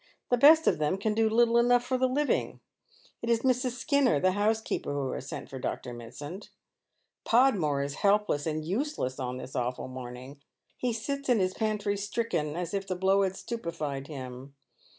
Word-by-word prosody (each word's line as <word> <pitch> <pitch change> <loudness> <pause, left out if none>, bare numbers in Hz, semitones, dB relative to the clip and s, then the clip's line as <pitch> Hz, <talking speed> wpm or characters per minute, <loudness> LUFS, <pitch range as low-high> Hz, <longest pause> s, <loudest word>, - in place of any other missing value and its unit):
The 245 - +5
best 315 +5 +7
of - - +3
them 155 +5 +1
can 215 +2 0
do 220 0 +2
little 235 +1 +4
enough 245 0 +4
for 255 +1 -1
the 260 0 +2
living. 285 +3 0 0.6
It 230 - -3
is 230 -1 +3
Mrs. 255 -1 +1
Skinner, 280 - +2
the 185 +5 +3
house 210 +3 +1
keeper, 220 - -3
who 140 -2 -2
has 135 - -6
sent - - -6
for 135 - -8
Dr. 125 0 -4
Mitsand. 145 - -8 0.7
Podmore 195 - +3
is 140 0 -4
helpless 200 -7 +2
and 155 0 -2
useless 200 - -2
on 125 -1 -3
this 130 - -9
awful 125 +1 -2
morning. 130 +2 -9 0.3
He 250 - -1
sits 280 +5 -3
in 245 - +5
his 185 -2 +1
pantry 210 -2 -1
stricken, 200 -7 -2
as 175 +1 -4
if 195 -1 -2
the 185 - -2
blow 190 +2 +3
had 190 -1 0
stupefied 155 - -4
him. 130 -1 -8
195 Hz, 185 wpm, -29 LUFS, 140-235 Hz, 0.7 s, best